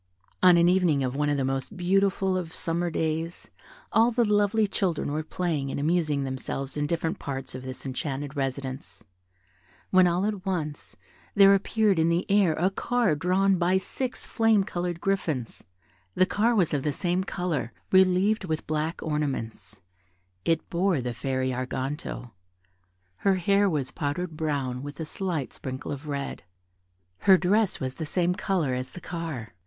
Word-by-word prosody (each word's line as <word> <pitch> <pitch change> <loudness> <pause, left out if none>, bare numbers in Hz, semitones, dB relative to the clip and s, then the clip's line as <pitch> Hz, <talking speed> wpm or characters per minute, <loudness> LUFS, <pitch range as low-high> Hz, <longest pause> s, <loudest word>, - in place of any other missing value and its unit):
On 180 -1 +7
an 170 0 +5
evening 175 -6 +3
of 130 0 -2
one 145 +1 +1
of 145 - +1
the 135 - 0
most 135 +6 -3
beautiful 190 +1 +2
of 175 -3 -4
summer 170 +1 -1
days, 160 +1 -3 0.4
all 225 +2 +5
the 240 0 +2
lovely 210 +1 +3
children 185 -7 -1
were 155 +2 -1
playing 155 -3 -2
and - - -3
amusing 155 -2 +1
themselves 135 +1 -4
in 145 0 -1
different 165 +3 -1
parts 135 -1 -5
of 130 - -6
this 130 +1 -7
enchanted 140 +2 -4
residence, 135 -3 -4 0.9
when 185 -1 +6
all 175 +3 +1
at 205 -3 -2
once 160 -6 -4 0.4
there 200 -1 +8
appeared 200 -1 +2
in 160 +1 +3
the 170 +2 +1
air 200 -5 +4
a 180 +5 +1
car 235 -2 +1
drawn 185 +4 +2
by 180 +2 +3
six 255 +6 -4
flame 225 -3 +3
coloured 175 -3 -3
griffins: 160 -11 -2 0.5
the 185 - +5
car 225 +5 +1
was 180 -8 +2
of 145 - +1
the 150 - 0
same 175 +4 0
colour, 175 -11 -2 0.2
relieved 190 +3 +4
with 160 -3 -3
black 155 +2 -2
ornaments: 135 -9 -3 0.6
it 165 -1 0
bore 180 -2 +2
the 125 -1 -3
Fairy 130 +2 -1
Arganto. 130 0 -4 0.9
Her 195 - +2
hair 200 +2 +3
was 140 -6 -1
powdered 155 +3 -3
brown 140 -5 -2
with 145 0 -8
a 160 - -3
slight 165 -4 -3
sprinkle 130 0 -6
of 145 +2 -6
red. 140 -1 -4 0.8
Her 190 -1 +6
dress 200 +3 +2
was 130 -1 -2
of - - -26
the 160 - -3
same 180 +3 +1
colour 175 -8 0
as 125 0 -4
the - - -8
car. 160 - -5
165 Hz, 165 wpm, -27 LUFS, 140-190 Hz, 0.9 s, there